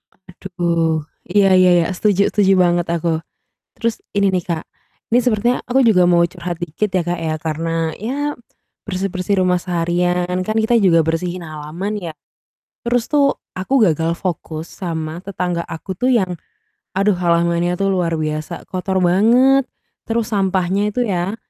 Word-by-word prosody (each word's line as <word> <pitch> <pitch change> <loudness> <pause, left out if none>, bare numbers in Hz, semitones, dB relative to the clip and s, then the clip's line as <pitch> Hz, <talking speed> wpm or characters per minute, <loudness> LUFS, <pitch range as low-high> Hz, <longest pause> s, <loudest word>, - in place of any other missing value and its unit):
Aduh. 170 -4 -2 0.2
Iya 195 +1 +3
iya 185 0 +6
iya. - - -3
Setuju 200 +1 +2
setuju 195 -2 +3
banget 175 -1 +2
aku. 165 -1 0 0.6
Terus 230 -1 -2
ini 200 -1 +2
nih 180 - 0
Kak, 165 -2 -3 0.5
ini 245 - +6
sepertinya 240 +1 +1
aku 255 +2 +1
juga 180 -5 +5
mau 175 -1 +4
curhat 175 -1 -6
dikit 175 +4 -2
ya 185 - +1
Kak 175 -1 -1
ya, 160 -1 -2
karena 165 +1 -2
ya 285 +7 -3 0.5
bersih-bersih 190 0 -1
rumah 180 -1 +3
seharian, 180 +1 0
kan 215 +3 -3
kita 220 +2 +2
juga 165 -3 +5
bersihin 175 +2 -2
halaman 155 +7 -5
ya. 165 -4 -6 0.7
Terus 240 0 0
tuh 280 -1 +3 0.2
aku 215 +5 +2
gagal 165 0 0
fokus 160 -3 -4
sama 165 -2 -5
tetangga 180 -3 -2
aku 185 +4 -6
tuh 250 +8 0
yang, 190 -8 +2 0.6
aduh 200 0 +3
halamannya 170 0 +1
tuh 195 - 0
luar 170 -3 0
biasa, 155 +2 -4
kotor 190 +1 -2
banget. 245 +9 +4 0.4
Terus 230 -1 +1
sampahnya 195 +1 +1
itu 245 +2 -1
ya, 190 +2 -1
180 Hz, 150 wpm, -19 LUFS, 170-200 Hz, 0.7 s, iya